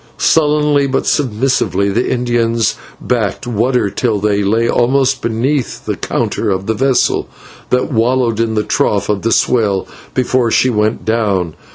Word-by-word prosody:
Sullenly, 150 -2 +2
but 135 - -1
submissively, 110 - 0
the 115 +5 0
Indians 115 -2 0 0.3
backed 110 -5 -2
water 120 -2 0
till 110 +1 0
we 100 0 0
lay 110 +4 +1
almost 130 +2 +1
beneath 120 +4 -2
the - - -2
counter - - -2
of 95 -1 -1
the 110 - 0
vessel, 130 +3 +1 0.4
that 125 0 0
wallowed 120 -1 +1
in 115 -1 0
the 105 - +1
trough 100 -1 0
of 105 -2 0
the 115 - -1
swell 105 -7 +1 0.3
before 125 -1 +1
she 130 +3 +2
went 110 0 -1
down. 100 -7 0
115 Hz, 150 wpm, -15 LUFS, 105-130 Hz, 0.4 s, Sullenly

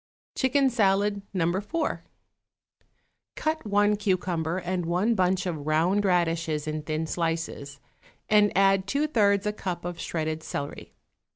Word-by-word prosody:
=Chicken 265 0 +2
Salad, 200 -2 +2
No. 180 -4 0
4.= 205 - -1 1.4
Cut 315 -6 -2
one 205 +1 +3
cucumber 180 -4 -1
and 180 -1 -2
one 185 +7 +2
bunch 185 -1 +1
of 155 -5 -4
round 175 +7 +2
radishes 165 -4 +1
in 155 0 -2
thin 155 +1 -2
slices, 165 -4 -3 0.5
and 210 -1 +4
add 195 0 +4
two 280 +8 +1
thirds 205 -8 +2
a 210 - 0
cup 180 -4 -5
of 175 -1 -5
shredded 160 -1 -3
celery. 145 -2 -6
185 Hz, 130 wpm, -26 LUFS, 165-205 Hz, 1.4 s, and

